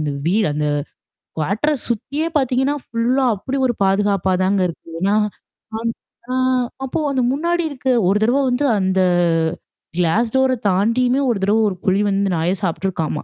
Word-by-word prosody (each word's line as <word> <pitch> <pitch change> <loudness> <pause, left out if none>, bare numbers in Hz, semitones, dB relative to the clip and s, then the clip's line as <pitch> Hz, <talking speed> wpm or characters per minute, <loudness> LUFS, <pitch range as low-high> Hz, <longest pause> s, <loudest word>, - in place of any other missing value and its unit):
இந்த 150 -2 -2 0.2
வீடு 210 +3 +2
அந்த 150 0 -1 0.7
குவார்டர்ஸ் 240 - 0
சுத்தியே 280 +8 -2
பார்த்தீங்கன்னா, 265 +1 +1
ஃபுல்லா 245 +4 0
அப்பிடி 260 +7 -4
ஒரு 240 - 0
பாதுகாப்பா 195 -1 +1
தாங்க 195 +1 +2
இருக்கு. 165 0 -11
ஏன்னா 200 +2 +2 0.6
நான் 230 +1 -1 0.4
ஆ - - -1 0.5
அப்போ 265 - -3
அந்த 265 -2 0
முன்னாடி 340 +4 0
இருக்க 265 -2 -7 0.2
ஒரு 195 +3 +3
தடவ 245 +5 +2
வந்து 250 +4 0
அந்த 190 0 +1 1.0
கிளாஸ் 205 +7 +1
டோர 265 0 +3 0.2
தாண்டியுமே 240 +7 +2
ஒரு 230 - +1
தடவ 210 +3 +3
ஒரு 190 - -5
புலி 195 +2 +2
வந்து 195 -1 0
நாய 165 +3 0
சாப்ட்டுருக்காமா! 170 -4 -2
215 Hz, 150 wpm, -19 LUFS, 190-260 Hz, 1.0 s, ஒரு